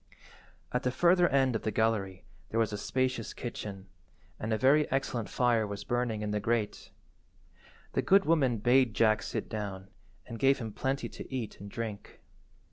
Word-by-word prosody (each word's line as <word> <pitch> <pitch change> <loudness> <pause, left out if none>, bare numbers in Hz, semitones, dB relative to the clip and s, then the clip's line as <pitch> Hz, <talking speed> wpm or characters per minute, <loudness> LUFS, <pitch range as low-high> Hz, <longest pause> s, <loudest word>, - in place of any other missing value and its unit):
At 125 - 0
the 125 - 0
further 175 +6 +4
end 135 -3 +2
of 110 - -1
the - - -1
gallery 105 -4 0 0.2
there 115 - -1
was 110 -2 +1
a - - -2
spacious 130 -1 -1
kitchen, 100 -5 -6 0.5
and 110 - -3
a 110 - +2
very 140 +5 +4
excellent 125 -5 -1
fire 120 -3 +2
was 100 0 -6
burning 120 -3 -1
in 105 - -2
the 105 - 0
grate. 110 0 -1 1.0
The - - +1
good 195 0 +4
woman 140 -7 +3
bade 120 +1 +3
Jack 110 -1 +3
sit - - -4
down, 100 -3 -5 0.4
and 115 -2 -8
gave 135 0 +4
him 110 -3 -6
plenty 135 +4 -2
to - - -10
eat 125 -5 -4
and 100 - -8
drink. 110 -1 -6
115 Hz, 175 wpm, -30 LUFS, 105-130 Hz, 1.0 s, further